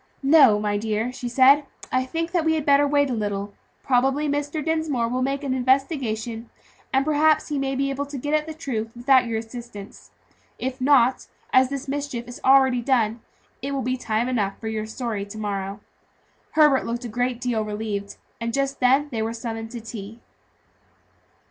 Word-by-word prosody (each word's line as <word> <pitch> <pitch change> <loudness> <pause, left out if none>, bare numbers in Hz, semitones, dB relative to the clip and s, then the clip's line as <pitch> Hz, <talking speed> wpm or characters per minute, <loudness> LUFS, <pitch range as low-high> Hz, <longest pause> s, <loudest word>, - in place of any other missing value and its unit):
"No, 270 -7 +6
my 205 -1 -1
dear," 220 +2 -1
she 245 -2 -5
said; 270 +4 +6 0.3
"I 255 0 +1
think 330 +5 -3
we 320 -2 +2
had 305 -2 -2
better 285 0 +5
wait 285 -1 +2
a - - 0
little. 205 -2 -3 0.3
Probably 270 +3 +2
Mr. 290 +1 -2
Dinsmore 315 -7 0
will 250 +2 -2
make 275 +2 -1
an 270 -2 -1
investigation, 250 -4 0 0.4
and 270 +1 +2
perhaps 310 +1 +3
he 295 -2 -1
may 270 0 -1
be 275 +1 0
able 280 +1 -3
to 285 0 -6
get 290 +4 -3
at 305 0 +1
the 315 - -6
truth 230 -8 -4
without 255 +1 +4
your 225 -1 -1
assistance; 225 -3 -9 0.5
and 260 - -1
if 255 - -21
not, 260 -2 +3 0.3
as 260 0 +5
the 275 0 -4
mischief 275 -4 -4
is 245 - -9
already 265 -2 +5
done, 235 -3 +1 0.4
it 275 +2 -3
will 270 -2 -2
be 255 +1 0
time 230 -1 -1
enough 210 -6 -1
for 220 - -4
your 215 -1 -3
story 220 -3 -4
to 205 +2 -9
morrow." 200 -1 -4 0.7
Herbert 300 -4 +5
looked 240 +1 -3
a - - -3
good 245 +2 -1
deal 245 -3 -1
relieved, 210 -1 -4 0.2
and 230 0 -3
just 275 0 -1
then 265 +4 +3
they 225 -3 -2
were 225 +1 -2
summoned 225 -1 -5
to 235 0 -7
tea. 220 0 -8
255 Hz, 185 wpm, -24 LUFS, 225-275 Hz, 0.7 s, No